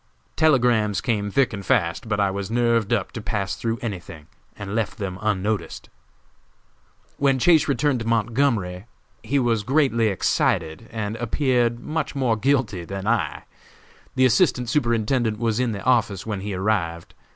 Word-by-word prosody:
Telegrams 120 - +3
came 105 -4 -1
thick 130 +3 +1
and 100 -1 -5
fast, 110 -4 0
but 105 -1 0
I 100 -1 +2
was 100 0 -4
nerved 115 -2 +1
up 105 -5 0
to 115 - -6
pass 105 -3 -2
through 115 0 -2
anything, 85 -8 -6 0.3
and 100 0 -6
left 115 0 -2
them 95 -4 -5
unnoticed. 105 0 -2 1.3
"When 135 -1 +2
Chase 155 +3 +4
returned 140 -2 +1
to 110 - -5
Montgomery 115 -4 0 0.3
he 125 +5 -1
was 120 -4 +1
greatly 125 -2 +2
excited 90 -1 0
and 110 -1 -4
appeared 120 -1 +1
much 155 +3 -3
more 130 -5 +1
guilty 110 -6 0
than 95 +2 -6
I. 115 +1 0 0.7
The 130 - +4
Assistant 125 -2 +2
Superintendent 115 -3 +1
was 115 0 0
in 125 -2 +1
the 100 -2 -5
office 115 -7 +1
when 105 -3 -3
he 100 0 -4
arrived. 90 -4 -2
115 Hz, 150 wpm, -23 LUFS, 100-125 Hz, 1.3 s, Chase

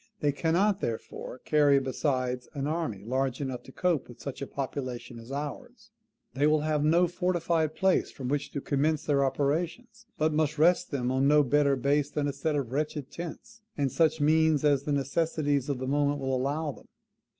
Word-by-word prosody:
THEY 145 -2 +2
CANNOT 180 +7 +1
THEREFORE 115 +2 -5
CARRY, 145 -2 +4
BESIDES, 130 -2 -1
AN 140 -1 -2
ARMY 150 - -2
LARGE 130 +1 -1
ENOUGH 130 -3 -4
TO - - -14
COPE 170 -1 0
WITH 120 - -13
SUCH 140 -1 -7
A 140 - -3
POPULATION 125 -4 -5
AS 115 +3 -11
OURS. 210 - -6 0.4
THEY 140 +4 +2
WILL 155 0 +3
HAVE 150 -1 0
NO 170 +4 +4
FORTIFIED 170 -3 0
PLACE 190 -1 +2
FROM 130 - -7
WHICH 145 +2 -2
TO 140 - -4
COMMENCE 145 +3 0
THEIR 140 -2 +2
OPERATIONS; 170 - -2
BUT 155 0 +1
MUST 155 0 +1
REST 170 +4 +3
THEM 125 -3 -1
ON 130 +1 +2
NO 150 0 +5
BETTER 140 +1 +3
BASE 140 +2 +1
THAN 145 -1 -1
A - - -3
SET 150 +2 -1
OF 135 -5 -2
WRETCHED 150 0 -2
TENTS, 220 +7 -8 0.2
AND 140 -3 0
SUCH 160 -1 +2
MEANS 155 0 +3
AS 140 -2 +3
THE 150 - -1
NECESSITIES 145 0 0
OF 140 - 0
THE 130 - -4
MOMENT 145 +1 +1
WILL 135 -1 -2
ALLOW 145 +4 -1
THEM. - - -17
145 Hz, 190 wpm, -28 LUFS, 135-160 Hz, 0.4 s, NO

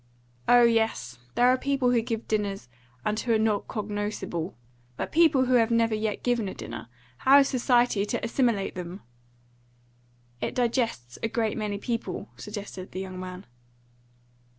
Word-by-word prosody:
"Oh 245 0 +7
yes. 220 - +1 0.2
There 245 - +4
are 255 +1 +4
people 275 -3 +1
who 240 -2 +3
give 225 0 -4
dinners, 200 - -2 0.4
and 210 +1 0
who 235 -1 +1
are - - +4
not 215 -2 +1
cognoscible. 205 -5 -3 0.4
But - - -3
people 310 -5 +5
who 255 - +1
have 230 -2 +4
never 230 -1 +2
yet 215 -1 -2
given 240 -4 +1
a - - -7
dinner, 115 - -7 0.3
how 270 +2 +7
is 275 -1 +5
society 245 -4 +3
to - - -2
assimilate 230 -4 +1
them?" 180 +1 -7 1.4
"It - - -2
digests 230 - -1
a 225 - +1
great 225 -1 -1
many 210 -2 -2
people," 230 +3 -4
suggested 205 -3 -7
the 185 - -4
young 185 -1 -6
man. 185 +1 -7
220 Hz, 155 wpm, -27 LUFS, 200-245 Hz, 1.4 s, Oh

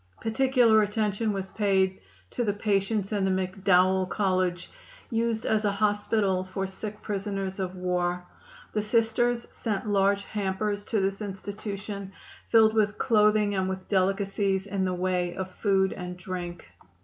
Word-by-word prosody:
Particular 235 -1 +4
attention 210 +1 0
was 195 -1 -4
paid 190 -3 +1 0.3
to 240 - -1
the 205 -3 0
patients 205 0 0
in 205 -2 0
the 190 - +2
McDowell 185 0 +2
College, 185 -3 0 0.4
used 230 -1 0
as 215 0 +1
a 205 - +2
hospital 205 -2 +1
for 185 +1 -4
sick 205 +2 -7
prisoners 195 -2 -3
of 185 -1 -3
war. 180 -1 -1 0.5
The 215 - +1
Sisters 230 +2 +1
sent 215 -2 -3
large 200 0 +2
hampers 205 0 -2
to 220 - 0
this 195 +1 -1
institution 200 0 -6 0.3
filled 220 -1 +5
with 210 -1 +1
clothing 210 -2 +3
and 190 -1 0
with 190 0 -5
delicacies 195 0 +1
in 195 -1 -1
the 185 -1 -1
way 180 -1 -1
of 190 0 -4
food 190 -1 +1
and 180 -1 -6
drink. 180 - -6
200 Hz, 145 wpm, -27 LUFS, 190-210 Hz, 0.5 s, filled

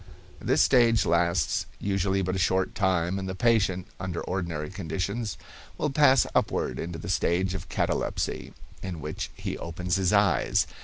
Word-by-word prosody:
This - - +3
stage 115 -3 +4
lasts 85 -2 +1
usually 95 -1 0
but 95 0 -1
a - - -1
short 95 +2 +1
time, 95 -1 +1
and 95 -1 -4
the 95 - -4
patient, 95 -4 +2
under 95 -2 -4
ordinary 85 -4 -3
conditions, 100 +3 -3 0.4
will 150 - -1
pass 135 -2 +5
upward - - 0
into 85 0 -4
the 80 - -8
stage 90 0 +1
of 90 -2 -6
catalepsy, - - -2 0.3
in 90 -4 -5
which 70 - -5
he - - -5
opens 90 +2 -2
his 95 -2 +2
eyes. 100 -11 +3
95 Hz, 155 wpm, -27 LUFS, 85-100 Hz, 0.4 s, pass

